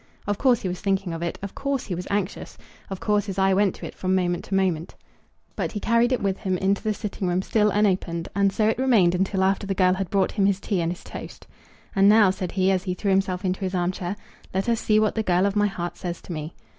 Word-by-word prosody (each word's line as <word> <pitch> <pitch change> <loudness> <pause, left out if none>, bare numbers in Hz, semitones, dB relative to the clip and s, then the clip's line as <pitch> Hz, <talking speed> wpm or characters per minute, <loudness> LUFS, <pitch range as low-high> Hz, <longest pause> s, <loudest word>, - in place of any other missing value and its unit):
Of 205 0 -2
course 250 -5 +3
he - - -1
was 180 0 -4
thinking 195 -3 0
of 165 - -5
it, 170 - -3
of 200 - -5
course 275 -2 -2
he 185 - -4
was 180 +1 -5
anxious, 200 -1 -3 0.3
of 195 -1 -5
course 210 -1 +1
his 195 -1 -4
eye 190 0 +3
went 195 -1 +2
to - - -8
it - - -7
from 185 0 -1
moment 175 -2 0
to 195 - -2
moment. 180 -4 0 0.6
But - - -3
he 210 - -3
carried 230 +3 +2
it 255 - 0
with 195 -1 0
him 185 -3 -1
into 195 +2 +1
the 215 -1 -1
sitting 200 -2 -4
room 180 +1 0
still 210 0 +2
unopened, 185 -5 0
and 200 -1 +3
so 215 +1 +1
it 220 +2 +1
remained 225 -10 +4
until 190 +1 0
after 195 +1 +1
the 195 - -1
girl 185 -1 +4
had 190 -1 -3
brought 195 -2 +1
him 195 -2 +2
his 200 -1 +1
tea 200 -3 -1
and 165 0 0
his 180 - -8
toast. - - -9 0.5
"And 195 0 +6
now," 210 -3 +6
said 185 -2 -5
he, 190 0 +2
as 190 0 0
he 180 -1 -2
threw 200 +1 -1
himself 190 0 0
into 185 0 -1
his 190 -1 -2
arm 175 0 +1
chair, 185 +1 -4 0.4
"let 190 +3 0
us 230 -1 +2
see 215 -1 +3
what 215 -1 +2
the 220 - 0
girl 180 -2 +2
of 200 0 0
my 205 0 +3
heart 175 -3 -5
says 175 -1 -5
to 175 - -6
me." 155 +1 -6
195 Hz, 270 wpm, -24 LUFS, 180-205 Hz, 0.6 s, And